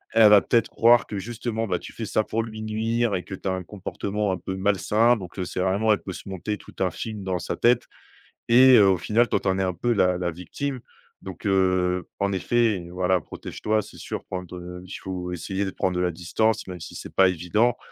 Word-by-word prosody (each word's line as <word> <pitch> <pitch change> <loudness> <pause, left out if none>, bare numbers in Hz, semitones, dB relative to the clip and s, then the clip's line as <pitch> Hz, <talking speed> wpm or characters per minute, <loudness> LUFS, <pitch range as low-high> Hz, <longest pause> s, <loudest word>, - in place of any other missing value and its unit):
elle 110 -2 +8
va 105 -1 +8
peut-être 115 - +1
croire 120 +1 +4
que 105 - -5
justement, 115 +1 -3
bah, 90 -2 -1
tu - - -10
fais 115 - -5
ça 110 - +1
pour 115 +1 -2
lui 110 -1 -8
nuire 110 0 0
et 90 - -3
que - - -9
tu 95 - -4
as - - +1
un 95 0 -3
comportement 100 +2 -3
un 90 - -1
peu 95 +2 -5
malsain, 105 +5 +2
donc 95 -1 -9
heu, 95 - 0
c'est 90 - -5
vraiment 100 +4 +2
elle 95 - -2
peut 95 - -5
se 95 - -9
monter 105 +3 -3
tout - - -14
un 90 -2 +2
film 105 0 -6
dans 95 -1 -1
sa - - -3
tête 120 0 +3 0.6
et 125 +1 +8
au 95 -2 +5
final, 115 +6 +2
toi - - +2
tu - - -5
en 95 - +1
est - - +1
un 90 -1 0
peu 120 +7 0
la 90 -3 +2
la 90 -1 -2
victime, 130 - -5 0.4
donc 95 +3 -9
heu, 90 -1 +1
en 100 0 0
effet 105 -2 +1
voilà 90 -1 +1
protège-toi. 110 +6 -2
C'est - - -14
sur - - -6
prendre 90 -1 -7
il 95 - -9
faut 90 -1 -5
essayer 95 +3 -3
de 95 - -3
prendre 90 -1 -1
de - - +1
la 90 -1 +1
distance, 95 +7 0
même 90 -3 -7
si - - -9
c'est - - -9
pas 95 -1 +6
évident 105 +8 +1
95 Hz, 235 wpm, -25 LUFS, 90-110 Hz, 0.6 s, elle